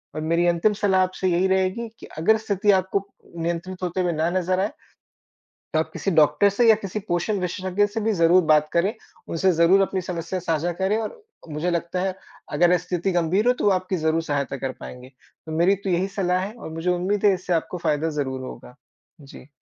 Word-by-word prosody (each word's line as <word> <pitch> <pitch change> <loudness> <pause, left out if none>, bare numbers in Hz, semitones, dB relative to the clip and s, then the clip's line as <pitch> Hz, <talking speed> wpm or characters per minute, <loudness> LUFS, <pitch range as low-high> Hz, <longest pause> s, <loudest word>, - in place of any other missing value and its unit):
और 155 - -3
मेरी 170 +2 +1
अंतिम 175 +5 +2
सलाह 195 -2 +2
आपसे 185 0 -2
यही 180 +2 +2
रहेगी 190 +4 0
कि - - -10
अगर 200 +8 +3
स्थिति 205 -1 +1
आपको 190 +1 0 0.3
नियंत्रित 170 +3 -4
होते 180 +1 -1
हुए 180 -1 +1
ना 160 +2 0
नज़र 185 +1 0
आए 200 +3 0 1.0
तो 155 - +2
आप 160 - -1
किसी 195 - -2
डॉक्टर 155 +3 +4
से 230 +4 +2
या 220 - +8
किसी 195 +2 -3
पोषण 175 +4 0
विशेषज्ञ 185 +2 0
से 210 +2 -4
भी 220 +1 +1
ज़रूर 175 0 +4
बात 150 -1 +4
करें, 185 +6 +1 0.3
उनसे 185 +3 +2
ज़रूर 170 +4 +4
अपनी 190 -1 -1
समस्या 175 0 -4
साझा 165 0 -1
करें 190 +4 0
और 325 - -6 0.3
मुझे 155 +3 -2
लगता 170 +1 -2
है 190 0 -1 0.4
अगर 175 +1 +4
स्थिति 180 +2 -2
गंभीर 175 +5 +1
हो - - +6
तो 250 - -5
वो 205 - +5
आपकी 185 0 -1
ज़रूर 160 0 0
सहायता 140 -3 -2
कर 130 - -1
पाएँगे। 125 0 -9 0.4
तो 160 - -6
मेरी 180 +4 +4
तो 195 - -1
यही 180 +2 +1
सलाह 180 -1 +1
है 205 - -8
और 235 - -9
मुझे 165 +3 -1
उम्मीद 185 +4 -1
है 200 - +5
इससे 185 0 -4
आपको 175 +2 -1
फायदा 150 +2 +1
ज़रूर 130 -2 -3
होगा। 125 - -10 0.5
जी। 135 -1 -13
180 Hz, 210 wpm, -23 LUFS, 165-195 Hz, 1.0 s, या